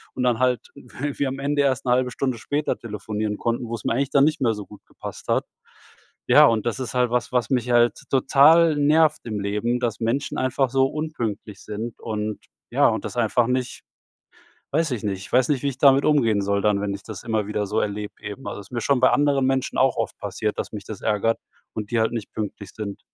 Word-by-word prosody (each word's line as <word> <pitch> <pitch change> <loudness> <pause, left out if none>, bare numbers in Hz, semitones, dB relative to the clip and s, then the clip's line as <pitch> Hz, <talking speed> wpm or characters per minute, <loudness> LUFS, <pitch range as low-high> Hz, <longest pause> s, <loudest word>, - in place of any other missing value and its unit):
und - - -3
dann 120 -2 +2
halt 125 -1 +2
wir 140 +2 -4
am 135 +1 -5
Ende 145 +1 +1
erst 135 -1 0
'ne - - +3
1/2 125 0 +1
Stunde 130 -2 -2
später 145 +7 -2
telefonieren 105 -1 -4
konnten, 120 0 -2
wo 115 - -6
es 110 - -9
mir - - +1
eigentlich 135 +2 -1
dann 140 0 +5
nicht 155 -1 0
mehr 115 -4 +3
so 105 -1 -7
gut 105 - -15
gepasst - - -10
hat. - - +2 0.8
Ja, - - +8
und 115 -2 +2
das 115 -1 -1
ist 130 - -5
halt 125 -1 +2
was, 125 +1 -1
was 125 +1 0
mich 125 -2 0
halt 120 0 +4
total 150 +4 +5
nervt 150 +2 +3
im 105 -3 -3
Leben, 105 +5 -1
dass 115 -3 -1
Menschen 120 +5 -1
einfach 130 0 +1
so 135 0 +3
unpünktlich 120 -9 -4
sind, 110 +2 -6
und 110 -1 -3 0.3
ja, - - +4
und - - -2
das - - -6
einfach 120 0 +2
nicht 125 0 -2 0.9
weiß 155 +1 +1
ich 115 - -3
nicht. 100 -2 -1
Ich 100 - -11
weiß 125 0 +4
nicht, 140 -3 0
wie 140 - +1
ich 135 - -5
damit 135 0 +5
umgehen 115 -9 +3
soll, 100 0 0
dann 105 -1 +2
wenn 100 -1 -1
ich 100 - -8
das 110 -4 -8
immer 110 -3 -1
wieder 105 -1 -2
so 105 +3 0
erlebe 105 0 -3
eben. 105 +5 -7
Also, - - -5
es 100 - -12
ist - - -26
mir 120 -2 -2
schon 140 -3 +2
bei 130 - +6
anderen 140 -2 +2
Menschen 135 -1 -1
auch - - +3
oft - - -3
passiert, 105 -1 -3
dass - - -4
mich 105 -3 -7
das 105 -2 -8
ärgert 110 +1 +1 0.4
und 105 -1 -5
die 120 - +1
halt 110 +1 +1
nicht 115 -3 -5
pünktlich 105 -1 -5
sind. 100 -2 -6
120 Hz, 235 wpm, -23 LUFS, 105-135 Hz, 0.9 s, Ja